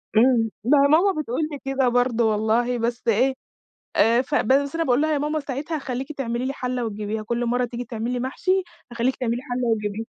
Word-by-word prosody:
إمم. 230 Hz, 0 st, +4 dB
ما 275 Hz, +6 st, +4 dB
هي -, -, +5 dB
ماما 320 Hz, +3 st, +3 dB
بتقول 255 Hz, +1 st, -3 dB
لي 290 Hz, -, -6 dB
كده 270 Hz, -2 st, +1 dB
برضو 240 Hz, -1 st, +2 dB
والله، 225 Hz, +3 st, +1 dB
بس 235 Hz, +1 st, -3 dB
إيه، 250 Hz, +5 st, +3 dB, 0.6 s
آآ، 230 Hz, +2 st, +4 dB
ف 285 Hz, +3 st, -3 dB
بس 280 Hz, +4 st, +2 dB
أنا 330 Hz, -, +1 dB
باقول 255 Hz, 0 st, +2 dB
لها: 310 Hz, 0 st, +1 dB
"يا -, -, +1 dB
ماما 300 Hz, +2 st, -1 dB
ساعتها 285 Hz, +3 st, -4 dB
هخلّيكِ 265 Hz, 0 st, -4 dB
تعملي 245 Hz, -4 st, -3 dB
لي 270 Hz, -, -2 dB
حلّة 250 Hz, -2 st, -3 dB
وتجيبيها. 215 Hz, 0 st, -4 dB
كُلّ 235 Hz, +2 st, -2 dB
مَرّة 245 Hz, +1 st, +1 dB
تيجي 245 Hz, +1 st, -6 dB
تعملي 235 Hz, +2 st, -3 dB
محشي، 370 Hz, +9 st, 0 dB, 0.3 s
هخلّيكِ 240 Hz, +2 st, 0 dB
تعملي 240 Hz, -1 st, -2 dB
حلّة 245 Hz, -1 st, -2 dB
وتجيبيها.". 215 Hz, -1 st, -1 dB
245 Hz, 200 wpm, -23 LUFS, 235-275 Hz, 0.6 s, هي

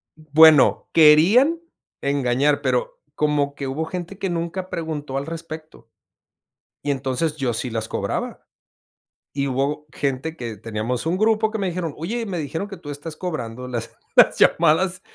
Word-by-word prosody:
bueno, 155 Hz, -1 st, +5 dB
querían 180 Hz, -, +6 dB, 0.4 s
engañar, 140 Hz, +1 st, +1 dB
pero, -, -, -1 dB, 0.2 s
como 145 Hz, -2 st, 0 dB
que 140 Hz, -, -5 dB
hubo 145 Hz, +5 st, -2 dB
gente 180 Hz, +3 st, -6 dB
que 195 Hz, -1 st, -2 dB
nunca 175 Hz, +2 st, -3 dB
preguntó 150 Hz, -5 st, -4 dB
al 140 Hz, -, -3 dB
respecto. 160 Hz, -1 st, -9 dB, 0.9 s
Y 145 Hz, -, -2 dB
entonces 135 Hz, +3 st, -2 dB
yo 130 Hz, -5 st, -1 dB
sí 120 Hz, +2 st, -3 dB
las 110 Hz, -1 st, -3 dB
cobraba. -, -, -4 dB, 0.9 s
Y 140 Hz, 0 st, -1 dB
hubo 140 Hz, +3 st, -1 dB
gente 140 Hz, +4 st, -2 dB
que, 115 Hz, -3 st, -6 dB
teníamos 115 Hz, +5 st, -3 dB
un 170 Hz, +3 st, 0 dB
grupo 220 Hz, +1 st, +2 dB
que 220 Hz, -, -3 dB
me 195 Hz, -2 st, -1 dB
dijeron: 170 Hz, -3 st, -3 dB
"Oye, 225 Hz, +9 st, -3 dB
me 190 Hz, -4 st, -4 dB
dijeron 160 Hz, +6 st, -4 dB
que 200 Hz, -, -8 dB
tú 150 Hz, -, -11 dB
estás 150 Hz, +2 st, -7 dB
cobrando 125 Hz, -8 st, -5 dB
las, 120 Hz, -2 st, -5 dB, 0.2 s
las -, -, +6 dB
llamadas 170 Hz, +3 st, +3 dB
155 Hz, 155 wpm, -22 LUFS, 140-175 Hz, 0.9 s, querían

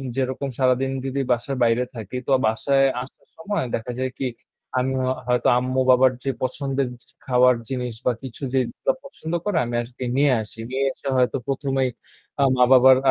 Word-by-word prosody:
যেরকম 130 Hz, +1 st, -2 dB
সারাদিন 130 Hz, 0 st, +2 dB
যদি 135 Hz, +1 st, -2 dB
বাসার 125 Hz, +3 st, 0 dB
বাইরে 115 Hz, +1 st, +3 dB
থাকি 110 Hz, 0 st, -7 dB
তো -, -, -4 dB, 0.2 s
বাসায় 135 Hz, +5 st, +2 dB, 0.2 s
আসার 130 Hz, -, -12 dB
সময় 205 Hz, +3 st, -2 dB
দেখা 115 Hz, +2 st, -5 dB
যায় 130 Hz, 0 st, -1 dB
কি 135 Hz, -, -1 dB, 0.5 s
আমি 130 Hz, +1 st, +1 dB, 0.3 s
হয়তো 125 Hz, -1 st, +2 dB
আম্মু 130 Hz, +1 st, 0 dB
বাবার 130 Hz, 0 st, +6 dB
যে 135 Hz, -, -1 dB
পছন্দের 135 Hz, +1 st, -1 dB, 0.4 s
খাওয়ার 125 Hz, 0 st, +5 dB
জিনিস 125 Hz, -2 st, -3 dB
বা -, -, +4 dB
কিছু 130 Hz, +1 st, -9 dB
যে 135 Hz, -, +4 dB, 0.4 s
পছন্দ 175 Hz, -, -7 dB
করে 205 Hz, -5 st, 0 dB
আমি 120 Hz, 0 st, -4 dB
আজকে 125 Hz, +2 st, -9 dB
নিয়ে 140 Hz, 0 st, +4 dB
আসি। 110 Hz, +1 st, -11 dB
নিয়ে 135 Hz, +1 st, -1 dB
এসে -, -, -10 dB
হয়তো 125 Hz, -1 st, +2 dB
প্রথমেই 135 Hz, -1 st, 0 dB, 0.5 s
আ -, -, +5 dB
মা-বাবার 130 Hz, +1 st, +7 dB
130 Hz, 165 wpm, -23 LUFS, 125-135 Hz, 0.5 s, মা-বাবার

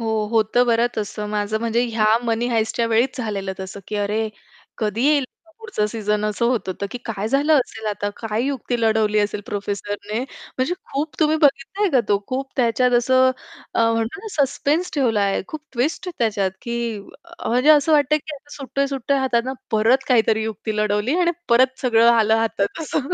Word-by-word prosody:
हो 225 Hz, -, -3 dB, 0.2 s
होतं 225 Hz, +2 st, +3 dB
बरं 235 Hz, 0 st, +3 dB
तसं. 210 Hz, 0 st, -4 dB
माझं 210 Hz, +1 st, -1 dB
म्हणजे 230 Hz, +1 st, +1 dB
ह्या 225 Hz, -2 st, 0 dB, 0.2 s
Money 230 Hz, +1 st, 0 dB
Heistच्या 225 Hz, +1 st, 0 dB
वेळीच 235 Hz, +5 st, +1 dB
झालेलं 200 Hz, -5 st, -3 dB
तसं 190 Hz, +1 st, -7 dB
की 210 Hz, -, -3 dB
अरे, 210 Hz, +2 st, -1 dB, 0.5 s
कधी 215 Hz, +1 st, -1 dB
येईल 295 Hz, -2 st, +3 dB, 0.2 s
हा -, -, -22 dB
पुढचा 445 Hz, -, -2 dB
सीझन? 210 Hz, -1 st, -1 dB
असं 215 Hz, +2 st, -1 dB
होतं 235 Hz, -6 st, 0 dB
तर 200 Hz, -, -1 dB
की 245 Hz, -, -5 dB
काय 215 Hz, -2 st, -3 dB
झालं 280 Hz, +5 st, +2 dB
असेल 220 Hz, -3 st, -4 dB
आता? 205 Hz, -1 st, -2 dB
काय 225 Hz, 0 st, -2 dB
युक्ती 260 Hz, -3 st, -2 dB
लढवली 220 Hz, -1 st, +2 dB
असेल 205 Hz, 0 st, 0 dB
प्रोफेसरने? 205 Hz, -1 st, -4 dB
म्हणजे 260 Hz, +3 st, -4 dB, 0.2 s
खूप 295 Hz, +3 st, -2 dB
तुम्ही 310 Hz, 0 st, +3 dB
बघितलंय 290 Hz, +9 st, +2 dB
का 260 Hz, -, +4 dB
तो, 205 Hz, -, +3 dB
खूप 265 Hz, +1 st, -3 dB
त्याच्यात 250 Hz, 0 st, +2 dB
असं 260 Hz, +1 st, +4 dB, 0.4 s
अ, -, -, +2 dB
म्हणतो 230 Hz, -, -2 dB
ना 445 Hz, -, -10 dB, 0.2 s
अ, -, -, +6 dB
सस्पेन्स 305 Hz, +6 st, -1 dB
ठेवला 240 Hz, -8 st, +2 dB
आहे. 200 Hz, -1 st, +1 dB
खूप 310 Hz, -, -6 dB
ट्विस्ट 270 Hz, +8 st, -1 dB
आहे 355 Hz, -, -9 dB
त्याच्यात 205 Hz, -5 st, +1 dB
की 235 Hz, -2 st, -3 dB, 0.5 s
म्हणजे 250 Hz, +6 st, +4 dB
असं 305 Hz, +1 st, +5 dB
वाटतंय, 300 Hz, 0 st, +4 dB
की 300 Hz, 0 st, -8 dB, 0.2 s
सुटतोय-सुटतोय 275 Hz, -1 st, -1 dB
हातातनं 260 Hz, -1 st, 0 dB, 0.2 s
परत 230 Hz, +4 st, +3 dB
काहीतरी 225 Hz, -3 st, +3 dB
युक्ती 220 Hz, 0 st, -4 dB
लढवली 210 Hz, +6 st, +1 dB
आणि 345 Hz, -1 st, +3 dB, 0.2 s
परत 255 Hz, +2 st, +3 dB
सगळं 235 Hz, -2 st, +4 dB
आलं 220 Hz, -1 st, +4 dB
हातात 225 Hz, +3 st, -1 dB
असं. 290 Hz, -2 st, -2 dB
230 Hz, 180 wpm, -21 LUFS, 215-270 Hz, 0.5 s, अ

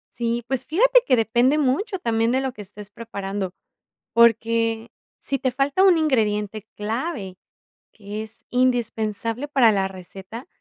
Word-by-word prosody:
Sí, 235 Hz, 0 st, -1 dB
pues 265 Hz, -2 st, -2 dB
fíjate -, -, +5 dB
que 255 Hz, -, +5 dB
depende 240 Hz, +6 st, +2 dB
mucho 300 Hz, -, 0 dB
también 230 Hz, -7 st, 0 dB
de 260 Hz, -, +2 dB
lo 265 Hz, -1 st, -2 dB
que 210 Hz, -, -10 dB
estés 205 Hz, +1 st, -11 dB
preparando, 200 Hz, -4 st, -5 dB, 0.6 s
porque 230 Hz, 0 st, +3 dB, 0.3 s
sí 275 Hz, -2 st, -2 dB
te 260 Hz, -, 0 dB
falta 275 Hz, +8 st, +1 dB
un 375 Hz, -3 st, +6 dB
ingrediente 215 Hz, -8 st, 0 dB
clave, 215 Hz, -, -4 dB, 0.6 s
que 210 Hz, 0 st, -7 dB
es 220 Hz, +2 st, -13 dB
indispensable 240 Hz, 0 st, 0 dB
para 260 Hz, -6 st, +4 dB
la 195 Hz, -1 st, 0 dB
receta, 190 Hz, -, -10 dB
230 Hz, 140 wpm, -23 LUFS, 210-260 Hz, 0.6 s, un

